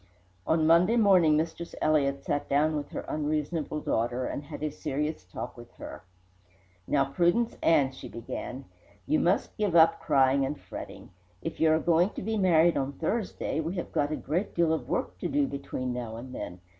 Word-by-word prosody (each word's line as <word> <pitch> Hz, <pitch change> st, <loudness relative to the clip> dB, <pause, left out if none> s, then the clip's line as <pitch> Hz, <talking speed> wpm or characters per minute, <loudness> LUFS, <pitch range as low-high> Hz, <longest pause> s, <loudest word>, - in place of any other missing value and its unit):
On 160 Hz, -1 st, +3 dB
Monday 175 Hz, +8 st, +5 dB
morning 185 Hz, -8 st, +5 dB
Mistress 165 Hz, +2 st, -3 dB
Elliott 140 Hz, -3 st, +1 dB
sat 145 Hz, -, -2 dB
down 150 Hz, +2 st, +2 dB
with 145 Hz, -1 st, -4 dB
her -, -, -5 dB
unreasonable 150 Hz, +1 st, -2 dB
daughter 120 Hz, +1 st, -1 dB
and -, -, -3 dB
had 150 Hz, 0 st, -8 dB
a 155 Hz, -, -1 dB
serious 150 Hz, -3 st, -3 dB
talk 90 Hz, -, -7 dB
with -, -, -13 dB
her. -, -, -9 dB, 0.9 s
"Now, 140 Hz, -1 st, +2 dB
Prudence 175 Hz, -, +1 dB
Ann," 140 Hz, -5 st, +4 dB
she 130 Hz, -1 st, -10 dB
began, 125 Hz, +3 st, -6 dB, 0.4 s
"you 155 Hz, -, +2 dB
must 180 Hz, +3 st, +1 dB
give 205 Hz, -5 st, 0 dB
up 165 Hz, -1 st, +6 dB
crying 135 Hz, -2 st, +3 dB
and 140 Hz, +2 st, -3 dB
fretting. -, -, -9 dB, 0.3 s
If 165 Hz, -, -5 dB
you 160 Hz, -1 st, +4 dB
are 155 Hz, -, +4 dB
going 170 Hz, +3 st, +3 dB
to -, -, -5 dB
be 220 Hz, +2 st, -1 dB
married 175 Hz, -4 st, +4 dB
on 135 Hz, +1 st, -1 dB
Thursday, 180 Hz, -, -2 dB
we 165 Hz, +4 st, -2 dB
have 175 Hz, -, -4 dB
got 145 Hz, +1 st, 0 dB
a -, -, 0 dB
great 165 Hz, +9 st, -3 dB
deal 170 Hz, -2 st, +3 dB
of 160 Hz, -, -3 dB
work -, -, -2 dB
to -, -, -2 dB
do 290 Hz, 0 st, +1 dB
between 130 Hz, -, -4 dB
now 120 Hz, -2 st, -5 dB
and 125 Hz, +3 st, -8 dB
then. 90 Hz, -6 st, -7 dB
155 Hz, 190 wpm, -28 LUFS, 140-170 Hz, 0.9 s, up